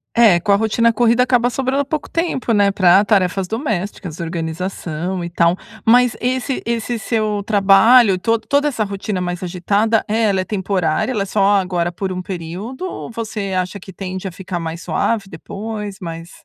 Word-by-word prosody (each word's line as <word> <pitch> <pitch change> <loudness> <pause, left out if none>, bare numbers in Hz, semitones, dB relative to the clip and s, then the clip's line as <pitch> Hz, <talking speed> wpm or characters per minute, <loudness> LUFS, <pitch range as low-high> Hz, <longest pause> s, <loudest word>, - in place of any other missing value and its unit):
É - - -11
é 210 -7 +6
com 205 - 0
a 200 - +6
rotina 225 +2 +2
corrida 235 +1 +3
acaba 245 -1 +3
sobrando 270 +3 -1
pouco 300 +2 -4
tempo, 330 -8 -1
né, 205 -2 +4
pra 190 +1 +5
tarefas 190 -2 +1
domésticas, 205 - -4
organização 170 +1 -4
e 170 - -4
tal. 170 0 +2 0.3
Mas 245 +1 +4
esse 255 +2 -1
esse 235 0 -2
seu 215 -1 -1
trabalho 205 +2 +5
e - - -4
to 230 +4 +1
toda 285 +4 +1
essa 230 -6 -1
rotina 200 -1 -3
mais 175 0 -3
agitada, 200 +5 +1
é 220 +2 0
ela 200 -3 +2
é - - -2
temporária? 190 0 -1
Ela 210 -5 -1
é - - -5
só 200 0 +3
agora 180 -2 -1
por 190 +2 -4
um 185 0 -3
período 190 - -6
ou 360 - -6
você 215 -4 -4
acha 185 +2 -2
que 190 0 -12
tende 185 0 -5
a - - -5
ficar 180 -1 -5
mais 165 0 -5
suave 225 -4 -1
depois? 205 +4 -6
Mais 165 0 -7
200 Hz, 185 wpm, -19 LUFS, 180-230 Hz, 0.3 s, é